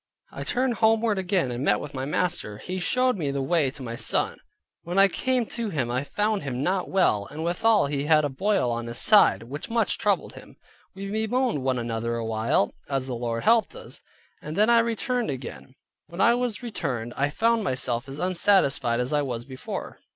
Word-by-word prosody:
I -, -, -6 dB
turned 250 Hz, -1 st, 0 dB
homeward 220 Hz, -2 st, +2 dB
again, 185 Hz, -8 st, 0 dB
and 120 Hz, +2 st, -3 dB
met -, -, +3 dB
with 145 Hz, -, -8 dB
my 130 Hz, -1 st, -3 dB
master. 145 Hz, -, -2 dB
He 185 Hz, -, -5 dB
showed 255 Hz, +5 st, +1 dB
me 150 Hz, -4 st, -1 dB
the 140 Hz, 0 st, -2 dB
way 155 Hz, -1 st, +2 dB
to 135 Hz, 0 st, -10 dB
my 115 Hz, -1 st, -5 dB
son. -, -, 0 dB, 0.4 s
When 175 Hz, +2 st, -5 dB
I 195 Hz, 0 st, +7 dB
came 250 Hz, +5 st, 0 dB
to 230 Hz, -2 st, -2 dB
him 130 Hz, -9 st, -2 dB
I 125 Hz, +2 st, -1 dB
found 210 Hz, +7 st, -1 dB
him 135 Hz, -2 st, -3 dB
not 185 Hz, +2 st, 0 dB
well: 105 Hz, -, +2 dB
and 155 Hz, +2 st, -6 dB
withall 205 Hz, +5 st, +3 dB
he 140 Hz, 0 st, -2 dB
had 155 Hz, -1 st, +4 dB
a -, -, +2 dB
boil 185 Hz, -, 0 dB
on 120 Hz, 0 st, -3 dB
his 115 Hz, 0 st, -5 dB
side, 205 Hz, -, +5 dB
which 140 Hz, +6 st, -7 dB
much 230 Hz, 0 st, 0 dB
troubled -, -, 0 dB
him. -, -, -13 dB, 0.4 s
We 195 Hz, +1 st, -6 dB
bemoaned 220 Hz, -, 0 dB
one 130 Hz, -1 st, 0 dB
another 115 Hz, 0 st, -2 dB
a 115 Hz, -1 st, -3 dB
while, 110 Hz, -2 st, 0 dB, 0.2 s
as 135 Hz, -2 st, -1 dB
the 130 Hz, -, -4 dB
Lord 115 Hz, -1 st, -3 dB
helped 230 Hz, -, +3 dB
us, -, -, -9 dB, 0.4 s
and 155 Hz, +1 st, -6 dB
then 215 Hz, +4 st, +4 dB
I 235 Hz, -, +6 dB
returned 235 Hz, +1 st, -1 dB
again. 125 Hz, -, -7 dB, 0.3 s
When 170 Hz, -, -10 dB
I 235 Hz, -, +5 dB
was 245 Hz, -1 st, -2 dB
returned, 130 Hz, -, -4 dB
I 140 Hz, +1 st, +1 dB
found 225 Hz, +7 st, +1 dB
myself 130 Hz, -4 st, -2 dB
as 135 Hz, -, -7 dB
unsatisfied 170 Hz, -9 st, +2 dB
as 125 Hz, +3 st, -1 dB
I 150 Hz, -, +3 dB
was 120 Hz, -4 st, -4 dB
before. 130 Hz, -2 st, -7 dB
150 Hz, 205 wpm, -25 LUFS, 125-215 Hz, 0.4 s, I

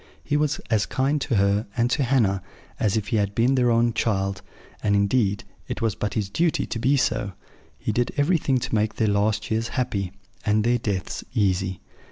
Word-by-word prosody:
He 145 Hz, -, -1 dB
was 150 Hz, 0 st, +1 dB
as 110 Hz, -2 st, +2 dB
kind 140 Hz, +3 st, 0 dB
to 135 Hz, -, 0 dB
her, 100 Hz, +2 st, +2 dB
and 120 Hz, 0 st, +3 dB
to 140 Hz, -, +1 dB
Hannah, 115 Hz, -7 st, +2 dB, 0.4 s
as 105 Hz, 0 st, +2 dB
if 105 Hz, -2 st, -3 dB
he 115 Hz, -, +1 dB
had 100 Hz, -1 st, 0 dB
been 120 Hz, +4 st, +3 dB
their 125 Hz, -2 st, +3 dB
own 115 Hz, 0 st, +3 dB
child: 100 Hz, -4 st, 0 dB, 0.4 s
and, 100 Hz, -1 st, +2 dB
indeed, 100 Hz, 0 st, +2 dB, 0.2 s
it -, -, -4 dB
was 115 Hz, -2 st, +1 dB
but 105 Hz, -, -3 dB
his 105 Hz, -3 st, 0 dB
duty 160 Hz, -, +1 dB
to 115 Hz, -, -4 dB
be 135 Hz, +5 st, +3 dB
so: 100 Hz, -6 st, 0 dB, 0.4 s
he -, -, -2 dB
did 120 Hz, +3 st, 0 dB
everything 145 Hz, -3 st, +2 dB
to 125 Hz, -, -4 dB
make 110 Hz, 0 st, +1 dB
their 110 Hz, -, +1 dB
last 105 Hz, +1 st, +1 dB
years 110 Hz, +1 st, 0 dB
happy, 100 Hz, -7 st, -1 dB, 0.3 s
and 105 Hz, 0 st, +2 dB
their 120 Hz, +2 st, +2 dB
deaths 100 Hz, -4 st, -3 dB
easy. 95 Hz, -2 st, +1 dB
110 Hz, 200 wpm, -24 LUFS, 100-125 Hz, 0.4 s, and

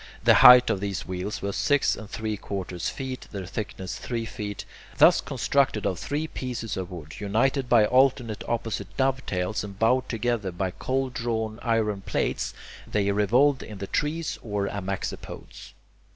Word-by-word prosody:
The -, -, +7 dB
height 125 Hz, 0 st, +9 dB
of 95 Hz, -, -1 dB
these 100 Hz, -1 st, -3 dB
wheels 95 Hz, +3 st, -4 dB
was 100 Hz, 0 st, -2 dB
six 145 Hz, -1 st, +2 dB
and 110 Hz, -2 st, -10 dB
three 110 Hz, -1 st, -3 dB
quarters 95 Hz, -3 st, -4 dB
feet, 130 Hz, -1 st, -6 dB
their 100 Hz, -3 st, -5 dB
thickness 95 Hz, -1 st, -5 dB
three 115 Hz, -2 st, -3 dB
feet. 105 Hz, -3 st, -6 dB, 0.3 s
Thus -, -, +6 dB
constructed 135 Hz, -6 st, 0 dB
of 90 Hz, -, -1 dB
three 150 Hz, +2 st, -2 dB
pieces 120 Hz, -8 st, -4 dB
of 95 Hz, -2 st, -4 dB
wood, 80 Hz, -4 st, -9 dB
united 125 Hz, +6 st, +1 dB
by 115 Hz, -3 st, +6 dB
alternate 125 Hz, -3 st, +2 dB
opposite 110 Hz, -4 st, -3 dB
dovetails 120 Hz, -9 st, 0 dB
and 100 Hz, -2 st, -8 dB
bound 125 Hz, +4 st, +2 dB
together 115 Hz, -4 st, -1 dB
by 95 Hz, +1 st, -2 dB
cold 130 Hz, +5 st, -2 dB
drawn 110 Hz, -2 st, -2 dB
iron 110 Hz, -4 st, 0 dB
plates, -, -, -2 dB, 0.4 s
they 100 Hz, -1 st, +1 dB
revolved 125 Hz, +8 st, +3 dB
in 105 Hz, -, -8 dB
the 100 Hz, -, -5 dB
trees 150 Hz, +9 st, -2 dB
or 105 Hz, -3 st, -2 dB
amaxopodes. 100 Hz, -1 st, -6 dB
110 Hz, 155 wpm, -26 LUFS, 100-125 Hz, 0.4 s, height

